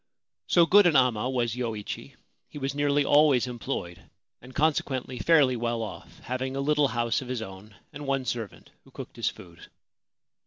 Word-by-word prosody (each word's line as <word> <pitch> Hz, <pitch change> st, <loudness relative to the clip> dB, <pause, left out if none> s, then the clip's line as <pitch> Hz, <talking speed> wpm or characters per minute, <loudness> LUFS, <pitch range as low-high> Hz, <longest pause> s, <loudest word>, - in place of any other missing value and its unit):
So 170 Hz, -1 st, +5 dB
good 200 Hz, +3 st, +6 dB
an 165 Hz, -, +2 dB
amma 125 Hz, -2 st, +3 dB
was 120 Hz, -3 st, -1 dB
Yoichi, 115 Hz, -4 st, -5 dB, 0.3 s
he -, -, -10 dB
was 135 Hz, -1 st, -3 dB
nearly 145 Hz, 0 st, +1 dB
always 145 Hz, -4 st, +4 dB
employed, 120 Hz, -8 st, -6 dB, 0.3 s
and, 130 Hz, +1 st, -14 dB
consequently, 135 Hz, -5 st, 0 dB
fairly 145 Hz, -6 st, +4 dB
well 115 Hz, -1 st, -2 dB
ofF, 110 Hz, -, -9 dB
having 130 Hz, +1 st, -4 dB
a -, -, -2 dB
little 150 Hz, +1 st, +2 dB
house 120 Hz, +1 st, -1 dB
of 130 Hz, -, -8 dB
his 125 Hz, -3 st, -3 dB
own 95 Hz, +1 st, -11 dB, 0.2 s
and 145 Hz, 0 st, -8 dB
one 135 Hz, -1 st, 0 dB
servant, 115 Hz, -5 st, -5 dB
who -, -, -20 dB
cooked -, -, -10 dB
his -, -, 0 dB
food. -, -, -13 dB
130 Hz, 170 wpm, -27 LUFS, 120-145 Hz, 0.3 s, good